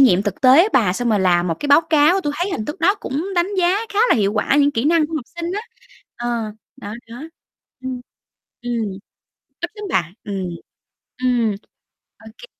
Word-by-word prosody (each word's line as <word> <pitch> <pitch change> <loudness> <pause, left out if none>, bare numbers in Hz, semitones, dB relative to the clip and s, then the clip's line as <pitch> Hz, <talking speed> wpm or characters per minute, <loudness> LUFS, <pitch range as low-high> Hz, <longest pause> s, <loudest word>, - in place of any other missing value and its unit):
nghiệm 200 -9 +5
thực 205 -2 -4
tế 275 +10 +6
bà, 210 -8 +3
xong 240 +5 -2
rồi 210 -2 +2
làm 180 -1 +3
một 165 - 0
cái - - -2
báo 285 +3 +7
cáo, 315 +5 +4
tui 295 -5 -2
thấy 355 +5 -1
hình 215 - -3
thức 295 - -6
đó 390 +4 +4
cũng 305 -5 -4
đánh 350 +2 +1
giá 360 +2 +3 0.2
khá 405 - -2
là - - +6
hiệu 200 -2 +1
quả 220 +6 +1
những 285 0 +4
kỹ 260 -2 -2
năng 320 -1 +3
của 325 - -7
học 250 - -5
sinh 340 +2 -3
á. 415 - -2 0.6
Ờ, 235 -3 -3 0.2
đó, 205 +1 -7 0.2
đó. 240 +4 -8 0.6
Ừm, 260 -1 -4 0.6
ừm, 240 -2 -1 0.8
ít 345 - -3
lắm 420 -1 -8
bà, 170 -1 0
ừm. 195 -3 -3 0.8
Ừm, 235 -4 +2 0.6
ô - - -17
kê. - - -11
255 Hz, 200 wpm, -20 LUFS, 215-330 Hz, 0.8 s, báo